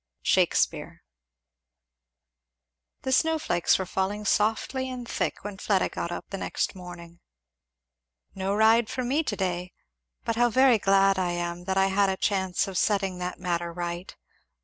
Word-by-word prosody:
Shakspeare. -, -, +1 dB, 2.0 s
The 260 Hz, -, -2 dB
snow 320 Hz, +4 st, +3 dB
flakes 175 Hz, -, +2 dB
were 190 Hz, -, -3 dB
falling 195 Hz, +3 st, -2 dB
softly 225 Hz, +6 st, 0 dB
and 250 Hz, -2 st, -6 dB
thick -, -, -2 dB
when 205 Hz, -1 st, -7 dB
Fleda 195 Hz, -3 st, +1 dB
got 170 Hz, -, -4 dB
up -, -, -5 dB
the 195 Hz, -, -4 dB
next -, -, -2 dB
morning. 175 Hz, -2 st, -11 dB, 1.1 s
"No 195 Hz, +1 st, -2 dB
ride 220 Hz, +1 st, +4 dB
for 260 Hz, 0 st, -3 dB
me 270 Hz, +6 st, +1 dB
to 245 Hz, -9 st, -3 dB
day 180 Hz, -2 st, -3 dB, 0.5 s
but 230 Hz, -, -1 dB
how 240 Hz, 0 st, +4 dB
very 255 Hz, -1 st, +5 dB
glad 195 Hz, 0 st, +3 dB
I 175 Hz, -1 st, 0 dB
am 175 Hz, 0 st, -4 dB
that 190 Hz, 0 st, -1 dB
I 195 Hz, -, +4 dB
had 200 Hz, 0 st, +3 dB
a 190 Hz, -, -1 dB
chance 190 Hz, -1 st, 0 dB
of 190 Hz, -2 st, -2 dB
setting 195 Hz, -3 st, 0 dB
that 180 Hz, 0 st, -4 dB
matter 170 Hz, -1 st, -2 dB
right. 175 Hz, +1 st, -5 dB
195 Hz, 155 wpm, -26 LUFS, 180-220 Hz, 2.0 s, very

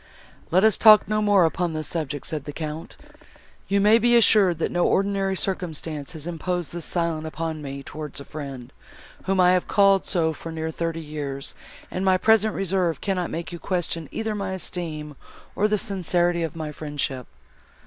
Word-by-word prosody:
"Let 185 Hz, +4 st, +3 dB
us 220 Hz, -2 st, +4 dB
talk 215 Hz, -2 st, +8 dB
no 215 Hz, 0 st, 0 dB
more 205 Hz, -4 st, +4 dB
upon 170 Hz, +1 st, -1 dB
this 155 Hz, -2 st, -3 dB
subject," 145 Hz, -4 st, -3 dB
said 150 Hz, -3 st, -4 dB
the 145 Hz, -, -5 dB
Count; 155 Hz, +1 st, -6 dB, 0.7 s
"you 200 Hz, 0 st, +2 dB
may 210 Hz, +3 st, +5 dB
be 240 Hz, +1 st, +4 dB
assured, 205 Hz, -6 st, +5 dB
that 165 Hz, -, -1 dB
no 175 Hz, 0 st, +1 dB
ordinary 195 Hz, 0 st, +1 dB
circumstance 165 Hz, -5 st, -3 dB
has 155 Hz, -2 st, -8 dB
imposed 175 Hz, 0 st, -3 dB
this 170 Hz, -2 st, -4 dB
silence 165 Hz, -2 st, -1 dB
upon 160 Hz, 0 st, -4 dB
me 140 Hz, -1 st, -6 dB
towards 150 Hz, -1 st, -6 dB
a 140 Hz, -, -9 dB
friend, 135 Hz, -4 st, -8 dB, 0.5 s
whom 195 Hz, 0 st, +1 dB
I 180 Hz, 0 st, +6 dB
have 180 Hz, -1 st, +1 dB
called 195 Hz, -1 st, +4 dB
so 160 Hz, -2 st, +1 dB
for 165 Hz, +2 st, -8 dB
near 160 Hz, 0 st, -3 dB
thirty 165 Hz, 0 st, -3 dB
years; 145 Hz, -3 st, -5 dB, 0.4 s
and 185 Hz, -, -3 dB
my 190 Hz, -1 st, +4 dB
present 220 Hz, +2 st, +3 dB
reserve 185 Hz, -3 st, 0 dB
cannot 185 Hz, -3 st, -1 dB
make 170 Hz, +2 st, -5 dB
you 170 Hz, -, -7 dB
question 170 Hz, -4 st, -2 dB
either 220 Hz, -1 st, -2 dB
my 195 Hz, -2 st, -3 dB
esteem, 155 Hz, -5 st, -5 dB, 0.4 s
or 210 Hz, -, +2 dB
the 210 Hz, 0 st, +1 dB
sincerity 175 Hz, -4 st, 0 dB
of 165 Hz, 0 st, -3 dB
my 155 Hz, -2 st, -4 dB
friendship." 145 Hz, -4 st, -4 dB
170 Hz, 180 wpm, -24 LUFS, 155-195 Hz, 0.7 s, talk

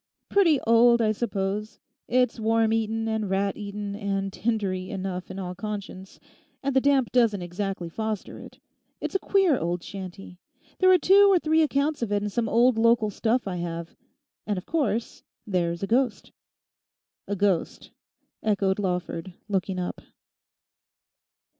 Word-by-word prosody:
'Pretty 335 Hz, -8 st, +4 dB
old, 235 Hz, +1 st, +5 dB
I 220 Hz, -2 st, +2 dB
suppose; 205 Hz, -1 st, -3 dB, 0.3 s
it's 250 Hz, 0 st, +1 dB
worm 225 Hz, 0 st, +2 dB
eaten 225 Hz, 0 st, -1 dB
and 220 Hz, -2 st, -1 dB
rat 195 Hz, +1 st, 0 dB
eaten 205 Hz, -1 st, -5 dB
and 195 Hz, -2 st, -2 dB
tindery 195 Hz, -5 st, -2 dB
enough 190 Hz, -3 st, -4 dB
in 190 Hz, -, -7 dB
all 180 Hz, -2 st, -4 dB
conscience; 195 Hz, -1 st, -7 dB, 0.4 s
and 275 Hz, -1 st, -1 dB
the 265 Hz, -, +5 dB
damp 275 Hz, -3 st, +2 dB
doesn't 225 Hz, -7 st, +2 dB
exactly 180 Hz, 0 st, -4 dB
foster 220 Hz, +3 st, -4 dB
it. -, -, -12 dB, 0.4 s
It's -, -, -4 dB
a 390 Hz, -, +2 dB
queer 380 Hz, -9 st, +2 dB
old 170 Hz, 0 st, -2 dB
shanty. 190 Hz, -1 st, -9 dB, 0.4 s
There 370 Hz, 0 st, +6 dB
are 370 Hz, -, +7 dB
two 390 Hz, +4 st, +6 dB
or 380 Hz, -, +5 dB
three 320 Hz, -1 st, +2 dB
accounts 290 Hz, -1 st, +1 dB
of 230 Hz, -3 st, -2 dB
it 205 Hz, 0 st, +1 dB
in 210 Hz, -, -1 dB
some 225 Hz, +1 st, -1 dB
old 235 Hz, 0 st, +4 dB
local 230 Hz, -2 st, +3 dB
stuff 230 Hz, +3 st, 0 dB
I 180 Hz, -2 st, -3 dB
have. 170 Hz, -1 st, -5 dB, 0.5 s
And 205 Hz, -2 st, -1 dB
of 185 Hz, -, -6 dB
course 270 Hz, -8 st, -1 dB, 0.2 s
there's 175 Hz, -3 st, -1 dB
a -, -, -1 dB
ghost.' 245 Hz, +1 st, 0 dB, 1.0 s
'A 205 Hz, -, -2 dB
ghost?' 195 Hz, -3 st, -1 dB, 0.5 s
echoed 200 Hz, -2 st, +1 dB
Lawford, 180 Hz, -2 st, -3 dB
looking 190 Hz, -2 st, -1 dB
up. 180 Hz, -1 st, -4 dB
210 Hz, 155 wpm, -26 LUFS, 190-235 Hz, 1.0 s, are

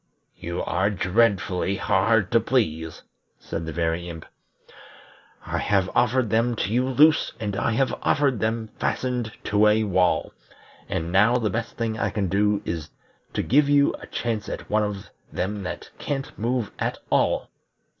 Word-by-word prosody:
"You 85 Hz, +1 st, -4 dB
are 95 Hz, +3 st, +1 dB
dreadfully 95 Hz, -2 st, +1 dB
hard 100 Hz, 0 st, +2 dB
to 115 Hz, -, +5 dB
please," 80 Hz, -, -1 dB, 0.3 s
said 80 Hz, 0 st, -6 dB
the -, -, -3 dB
Very 85 Hz, +2 st, -1 dB
Imp. 80 Hz, -2 st, -8 dB, 1.2 s
"I -, -, -2 dB
have 95 Hz, -2 st, +1 dB
offered 120 Hz, -2 st, +2 dB
them 115 Hz, +2 st, +2 dB
to 105 Hz, -1 st, -2 dB
you 125 Hz, +2 st, +1 dB
loose, 150 Hz, +4 st, +4 dB
and 105 Hz, -2 st, -3 dB
I 110 Hz, -, 0 dB
have 135 Hz, +3 st, +1 dB
offered 140 Hz, -5 st, +2 dB
them 110 Hz, +1 st, -1 dB
fastened 125 Hz, -3 st, -1 dB
to 105 Hz, +1 st, +3 dB
a 110 Hz, +1 st, +4 dB
wall, 95 Hz, -3 st, +1 dB, 0.6 s
and 80 Hz, +1 st, -2 dB
now 105 Hz, +6 st, +4 dB
the 110 Hz, -4 st, -1 dB
best 115 Hz, +2 st, -4 dB
thing 115 Hz, -1 st, -2 dB
I 100 Hz, -, +1 dB
can 100 Hz, -1 st, -2 dB
do 105 Hz, +2 st, +1 dB
is 80 Hz, -2 st, -4 dB, 0.4 s
to -, -, -1 dB
give 145 Hz, +3 st, +3 dB
you 145 Hz, 0 st, +4 dB
a -, -, -11 dB
chance 115 Hz, -3 st, -3 dB
at -, -, -6 dB
one 110 Hz, +1 st, +3 dB
of 105 Hz, -2 st, -4 dB, 0.2 s
them 100 Hz, +3 st, -3 dB
that 90 Hz, -, -6 dB
can't 135 Hz, -2 st, -4 dB
move 120 Hz, -1 st, -1 dB
at -, -, -1 dB
all. -, -, +1 dB
105 Hz, 165 wpm, -24 LUFS, 95-120 Hz, 1.2 s, to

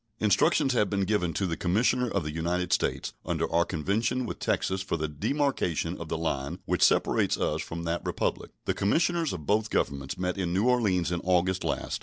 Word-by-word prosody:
Instructions 105 Hz, +5 st, +3 dB
have 105 Hz, -5 st, +2 dB
been 100 Hz, -1 st, 0 dB
given 95 Hz, -3 st, +1 dB
to 100 Hz, -, -1 dB
the 85 Hz, -3 st, -1 dB
commissioner 120 Hz, +8 st, +1 dB
of 100 Hz, -5 st, -1 dB
the 75 Hz, -, -4 dB
United 85 Hz, +2 st, -1 dB
States -, -, 0 dB
under -, -, -1 dB
our 85 Hz, 0 st, +4 dB
convention 100 Hz, +10 st, -1 dB
with -, -, -6 dB
Texas 95 Hz, 0 st, 0 dB
for 95 Hz, -3 st, -2 dB
the 80 Hz, -1 st, -1 dB
demarcation 85 Hz, -, -1 dB
of 80 Hz, -, -6 dB
the 80 Hz, -, -1 dB
line 70 Hz, -4 st, -2 dB
which -, -, -1 dB
separates -, -, +3 dB
us -, -, 0 dB
from 85 Hz, +1 st, -6 dB
that 85 Hz, +1 st, -2 dB
Republic. -, -, -2 dB, 0.2 s
The -, -, +1 dB
commissioners 165 Hz, -, +1 dB
of 80 Hz, -5 st, -6 dB
both 105 Hz, +4 st, +1 dB
Governments 70 Hz, -1 st, -1 dB
met 90 Hz, +1 st, -2 dB
in 90 Hz, -2 st, -1 dB
New 105 Hz, +6 st, +2 dB
Orleans 100 Hz, -9 st, +2 dB
in 85 Hz, -, 0 dB
August 95 Hz, +1 st, +1 dB
last. -, -, -2 dB
90 Hz, 200 wpm, -28 LUFS, 85-105 Hz, 0.2 s, our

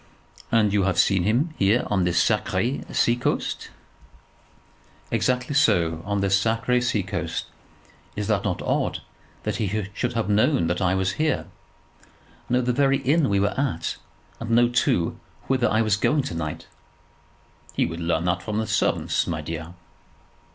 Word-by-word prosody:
And 105 Hz, -3 st, +3 dB
you 105 Hz, -, +3 dB
have 95 Hz, -2 st, 0 dB
seen 95 Hz, 0 st, +3 dB
him 130 Hz, -, +1 dB
here 105 Hz, +5 st, +3 dB
on 95 Hz, -3 st, +1 dB
this 90 Hz, -1 st, +2 dB
sacré 130 Hz, +5 st, 0 dB
sea 120 Hz, -, +2 dB
coast?" 120 Hz, -, -2 dB, 1.4 s
"Exactly 125 Hz, +2 st, 0 dB
so; 85 Hz, -, +2 dB
on 100 Hz, 0 st, -1 dB
this 100 Hz, 0 st, +2 dB
sacré 115 Hz, +2 st, +1 dB
sea 115 Hz, -5 st, 0 dB
coast. 95 Hz, -, -3 dB, 0.7 s
Is -, -, -3 dB
it -, -, +1 dB
not -, -, -2 dB
odd -, -, -1 dB, 0.4 s
that 105 Hz, -1 st, -2 dB
he 105 Hz, -1 st, -1 dB
should 120 Hz, +3 st, -2 dB
have 115 Hz, -2 st, -1 dB
known 110 Hz, -, +3 dB
that 90 Hz, +3 st, -1 dB
I 90 Hz, 0 st, +2 dB
was 95 Hz, 0 st, +1 dB
here, 155 Hz, -, +1 dB, 1.0 s
known 125 Hz, +1 st, +2 dB
the 125 Hz, 0 st, +1 dB
very 135 Hz, +1 st, +3 dB
inn 145 Hz, +2 st, +2 dB
we 100 Hz, -, +2 dB
were 100 Hz, +1 st, +1 dB
at, 125 Hz, -, -1 dB, 0.4 s
and 115 Hz, -, -6 dB
known, 120 Hz, +1 st, +4 dB
too, 85 Hz, -8 st, +1 dB, 0.3 s
whither 130 Hz, -2 st, +1 dB
I 110 Hz, +1 st, +2 dB
was 105 Hz, -2 st, +2 dB
going 145 Hz, +6 st, +2 dB
to 95 Hz, -, -5 dB
night?" 80 Hz, 0 st, -4 dB, 1.1 s
"He -, -, +2 dB
would 85 Hz, 0 st, -5 dB
learn 85 Hz, -1 st, 0 dB
that 90 Hz, +1 st, 0 dB
from 105 Hz, -1 st, -3 dB
the 110 Hz, -, 0 dB
servants, 110 Hz, 0 st, 0 dB
my 80 Hz, -3 st, -2 dB
dear." 80 Hz, +2 st, -6 dB
105 Hz, 165 wpm, -24 LUFS, 90-125 Hz, 1.4 s, known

